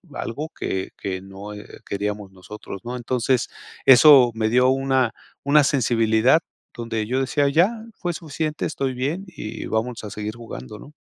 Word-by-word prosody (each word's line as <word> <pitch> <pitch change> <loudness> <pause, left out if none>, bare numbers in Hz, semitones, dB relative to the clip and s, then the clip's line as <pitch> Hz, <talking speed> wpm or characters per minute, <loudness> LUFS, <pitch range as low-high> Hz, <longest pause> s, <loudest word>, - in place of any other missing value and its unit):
algo 150 +7 -4
que 95 0 -2
que 95 -1 -4
no, 95 +2 -9
eh, 105 0 -11
queríamos 105 0 -4
nosotros, 95 +1 -10
¿no? 125 +1 -5
Entonces, 125 0 0 0.4
eso 130 -1 +8
me 110 -1 0
dio 125 +2 +4
una 130 -3 +1 0.3
una 145 +1 +5
sensibilidad 120 0 +3 0.3
donde 115 -2 -3
yo 130 +2 0
decía: 140 +2 +1
"Ya, 170 +8 +4 0.3
fue 175 -2 -2
suficiente, 155 -1 -3
estoy 135 -3 -2
bien 155 +10 -2
y 110 -11 -7
vamos 115 +1 -2
a 105 - -6
seguir 105 +2 -5
jugando", 105 - -9
¿no? 150 - -13
120 Hz, 155 wpm, -23 LUFS, 105-140 Hz, 0.4 s, eso